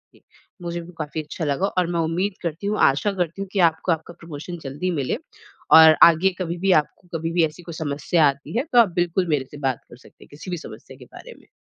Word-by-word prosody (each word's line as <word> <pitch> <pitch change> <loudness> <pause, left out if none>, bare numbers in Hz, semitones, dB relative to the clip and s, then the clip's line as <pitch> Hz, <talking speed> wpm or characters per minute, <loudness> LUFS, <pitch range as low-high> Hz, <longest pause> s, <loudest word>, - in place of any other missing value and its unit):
इ - - -22 0.4
मुझे 170 0 -4
भी 170 +2 -12
काफ़ी 155 0 -4
अच्छा 155 +2 -6
लगा 145 +7 0
और 180 -2 +2
मैं 170 - -1
उम्मीद 175 +5 -1
करती 170 +4 -4
हूँ, 210 - -1
आशा 145 +10 +3
करती 180 0 -3
हूँ 195 - -4
कि 200 - -1
आपको 160 +2 -4
आपका 160 +1 -3
प्रमोशन 165 +2 -8
जल्दी 145 +7 -3
मिले। 130 - -2 0.6
और 160 -1 +9
आगे 170 +3 +6
कभी 175 -1 -3
भी 190 +2 +1
आपको 180 +4 -23
कभी 165 +1 -3
भी 170 -2 +3
ऐसी 155 +3 -9
कोई 170 -1 -9
समस्या 155 +1 0
आती 140 +10 -3
है 250 - +1
तो 240 - +6
आप 225 - +5
बिल्कुल 175 +1 0
मेरे 140 -3 0
से 145 - -10
बात 130 -3 -2
कर 120 - -14
सकते - - -19
हैं - - -18
किसी 155 +5 -9
भी 175 - -2
समस्या - - -12
के - - -14
बारे - - -13
में। - - -24
165 Hz, 245 wpm, -22 LUFS, 155-180 Hz, 0.6 s, और